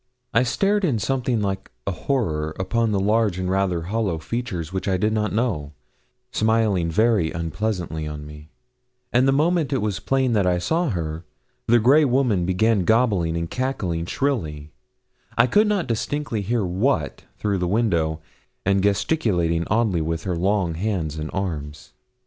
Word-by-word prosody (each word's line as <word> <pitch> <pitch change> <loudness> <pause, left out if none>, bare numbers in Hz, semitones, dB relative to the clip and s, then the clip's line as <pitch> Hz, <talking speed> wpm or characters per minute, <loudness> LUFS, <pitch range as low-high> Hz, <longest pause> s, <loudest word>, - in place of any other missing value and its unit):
I 115 - +5
stared 195 - +1
in 145 -10 +2
something 125 0 0
like 95 -1 -3 0.2
a 100 - 0
horror 80 - -1
upon 110 +4 0
the 100 - +1
large 105 -1 +2
and 95 0 -2
rather 95 -3 0
hollow 100 -2 -1
features 90 -2 -4
which 95 0 -3
I 95 -1 +2
did 105 +4 +1
not 105 -1 0
know, 100 - -1 0.6
smiling 110 -6 +2
very 105 -2 +2
unpleasantly 85 -1 -3
on 75 -1 -6
me; 75 +1 -12 0.6
and 125 +2 +4
the - - +5
moment 155 +2 +2
it 135 - +2
was 105 -5 -1
plain 130 -2 +1
that 100 -4 +2
I 90 -1 +2
saw 160 - 0
her, 80 -5 -3 0.4
the 120 - +5
grey 135 +7 +5
woman 120 -9 +2
began 100 +2 +2
gobbling 100 -7 +2
and 85 0 -2
cackling 90 -9 -2
shrilly 80 - -2 0.7
I - - +6
could 210 - +3
not 205 -4 +1
distinctly 120 0 -2
hear 110 +1 0
what 90 - -1
through 100 -2 -1
the 90 - 0
window 85 -7 +1 0.4
and 100 0 +3
gesticulating 95 - +1
oddly 105 -6 +1
with 80 +1 -2
her 90 -2 -2
long 95 0 +1
hands 80 -4 -2
and 75 0 -4
arms. 75 -7 -5
100 Hz, 160 wpm, -23 LUFS, 85-120 Hz, 0.7 s, I